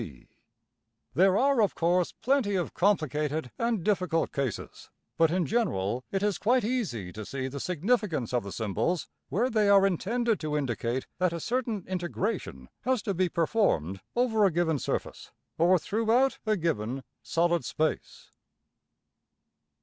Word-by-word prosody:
\] - - -54 0.3
There 190 +2 +4
are 275 -1 +3
of 205 - +1
course 175 +1 +2
plenty 250 -6 +1
of 180 -2 -2
complicated 155 -6 0
and 230 -6 0
difficult 180 -5 +1
cases; 135 -6 -4 0.3
but, 165 -1 +4
in 175 +1 +1
general, 130 - 0
it 195 0 -1
is 205 -4 0
quite 245 +4 +3
easy 185 - -2
to 110 - -6
see 130 +4 -4
the 140 +2 -6
significance 180 - 0
of 125 - +2
the 100 - -8
symbols 115 - -1 0.2
where 230 +7 +1
they 215 -2 +3
are 195 -1 +6
intended 225 +5 0
to 150 -1 -2
indicate 125 -2 -2
that 180 -2 +2
a 170 - -3
certain 230 -1 -2
integration 180 - -3
has 255 -4 0
to 200 - -1
be 185 0 +1
performed 155 - +1
over 235 -3 +2
a 195 - +6
given 160 -3 +1
surface, - - -4 0.3
or 175 +3 +5
throughout 230 - +1
a 215 -1 +2
given 135 - -2 0.2
solid 170 0 +1
space. 155 0 -3
180 Hz, 150 wpm, -28 LUFS, 150-215 Hz, 0.3 s, are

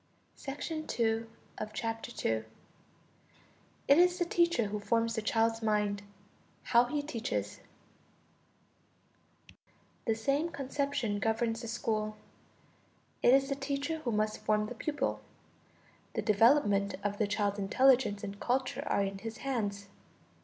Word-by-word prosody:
=It 310 +1 -4 2.9
is 350 +5 +6
the 350 - +1
teacher 340 -8 +2
who 210 +1 -3
forms 230 +2 +1
the 220 - -1
child's 225 +1 +1
mind. 210 -2 +1 0.6
How 235 0 +4
he 290 +3 -2
teaches=. 250 -5 -3 2.5
The 225 - +3
same 275 +9 0
conception 275 -7 -2
governs 225 +1 0
the 235 - -6
school: 215 -2 -2 1.0
it - - +6
is 270 +1 +4
the 275 - 0
teacher 280 +3 -2
who 255 -6 -2
must 215 0 0
form 210 0 +1
the 215 - -6
pupil; 290 +5 -2 0.9
the 220 - -1
development 210 -2 +4
of 205 0 -2
the 215 - +2
child's 205 0 0
intelligence 235 0 +3
and 200 0 -6
culture 255 +2 0
are 200 - +2
in 195 0 -3
his 225 +2 -6
hands. 205 -7 -2
230 Hz, 115 wpm, -32 LUFS, 210-275 Hz, 2.9 s, is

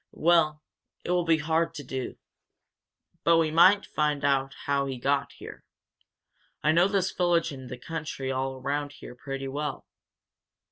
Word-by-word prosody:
"Well, 155 -2 +3 0.4
it - - -1
will 180 -1 +2
be 165 -1 +4
hard 160 +2 0
to 145 - -6
do. 130 0 -5 1.1
But 170 0 +5
we 160 -1 +2
might 185 +5 +6
find 150 -2 -1
out 135 -1 +1
how 140 -1 +1
he 135 -1 -4
got 140 +3 0
here. - - -11 1.0
I 155 - +4
know 170 +3 +4
this 195 -2 0
village 170 -2 +1
and 130 -2 -9
the 125 - -6
country 150 -1 -5
all 130 0 -2
around 140 +2 -3
here 125 - -11
pretty 135 +1 -6
well. 145 +1 -4
150 Hz, 155 wpm, -27 LUFS, 135-165 Hz, 1.1 s, might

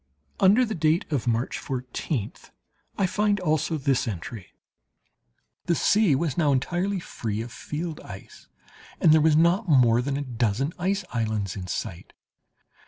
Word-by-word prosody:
Under 205 +6 +5
the 220 - -4
date 160 0 +1
of 130 -4 -1
March 120 +2 0
fourteenth 125 -2 -4 0.5
I 195 - +2
find 205 +2 +1
also 160 -2 0
this 135 -3 0
entry. 100 0 -6 1.2
"The 170 - +3
sea 200 -3 +3
was 155 0 -1
now 150 -3 +3
entirely 175 +8 0
free 110 -9 -4
of 115 +1 -7
field 155 +4 -5
ice, 95 -1 -12 0.5
and 160 - +5
there 160 - +5
were 160 - +5
not 170 +5 +3
more 120 -5 +5
than 140 +2 -2
a 145 - -2
dozen 120 +4 -1
ice 190 +2 -1
islands 110 -5 -2
in 90 -2 -6
sight. 85 -2 -5
145 Hz, 150 wpm, -25 LUFS, 115-175 Hz, 1.2 s, Under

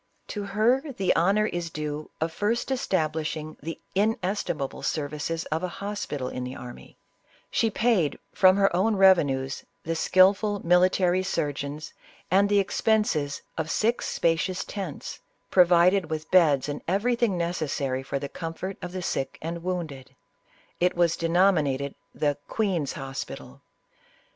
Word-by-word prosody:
To 210 - -4
her 235 +8 +1
the 195 -5 +1
honor 195 +6 +3
is 175 -4 -3
due 150 -1 -5
of 160 +1 -1
first 225 +9 -1
establishing 155 -8 -1
the 165 +3 -6
ines 205 -1 +1
timable 140 -4 -4
services 150 +2 -2
of 160 +1 0
a 185 - -1
hospital 190 -8 -4
in 125 - -4
the 125 +1 -6
army; 125 -2 -11 0.5
she 225 - +2
paid, 215 -8 +1 0.2
from 185 0 +5
her 195 -3 +3
own 210 +4 +2
revenues, 145 -9 +3 0.2
the 165 +1 -2
skillful 195 +4 +3
military 180 +1 +4
surgeons 145 -4 -3 0.4
and 200 +2 +4
the 205 - +3
expenses 195 -7 +1 0.2
of 160 -1 -2
six 230 +6 +1
spacious 170 +2 0
tents, 190 -8 -6 0.3
provided 180 0 +5
with 155 0 -4
beds 150 -7 +4
and 145 0 -4
everything 220 +2 +1
necessary 150 -6 -1
for 140 +1 -3
the 140 +1 -4
comfort 165 +6 -6
of 180 0 -6
the 185 -1 -4
sick 135 - -2
and 170 +1 -5
wounded; 155 -7 -5 0.6
it 180 +1 +2
was 170 -2 +3
denominated 165 -6 +2 0.2
the 145 -1 0
" - - -43
Queen's 185 -10 0
Hospital." 135 -3 -7
175 Hz, 140 wpm, -26 LUFS, 150-195 Hz, 0.6 s, from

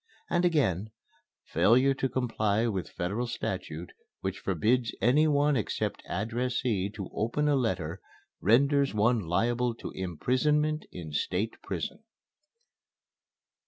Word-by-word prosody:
And 175 - +2
again: 110 - +1 0.6
"Failure 130 +5 +4
to 135 0 -1
comply 115 -4 0
with 100 -6 -2
Federal 100 +8 -2
Statute 90 -7 -4 0.3
which 95 0 -3
forbids 110 +6 +1
any 145 +7 +4
one 145 0 +3
except 110 - -2
addressee 115 0 -1
to 100 -4 -5
open 120 +7 0
a 145 - +4
letter 95 - -1 0.4
renders 140 +4 +3
one 115 +3 +3
liable 115 +7 0
to - - -7
imprisonment 150 - 0
in 80 -4 -7
State 90 +8 -1
Prison." 100 - -5
115 Hz, 115 wpm, -29 LUFS, 95-135 Hz, 0.6 s, Failure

